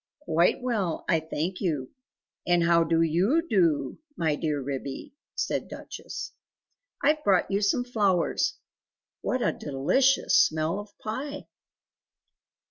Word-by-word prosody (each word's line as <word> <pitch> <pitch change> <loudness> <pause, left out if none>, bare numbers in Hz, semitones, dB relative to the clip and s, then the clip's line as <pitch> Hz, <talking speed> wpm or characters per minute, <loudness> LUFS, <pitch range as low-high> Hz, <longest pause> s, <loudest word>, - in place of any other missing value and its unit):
"Quite 175 - +2
well, 210 -10 -1
I 165 - +3
thank 160 +3 -4
you, 150 -9 -2 0.6
and 175 -1 +3
how 170 0 +4
do 165 0 +2
YOU 195 - +2
do, 165 - +1 0.2
my 160 -2 +1
dear 150 -2 -1
Ribby?" 135 - -5 0.2
said - - -2
Duchess. - - -7 0.7
"I've 300 +1 +3
brought 190 -2 +2
you 200 +1 +1
some 210 +4 +2
flowers; 205 -8 +1 0.7
what 255 -1 -1
a - - +2
delicious 200 - +2
smell 160 +4 +3
of 205 0 -11
pie!" 280 +7 -5
175 Hz, 125 wpm, -27 LUFS, 160-220 Hz, 0.7 s, how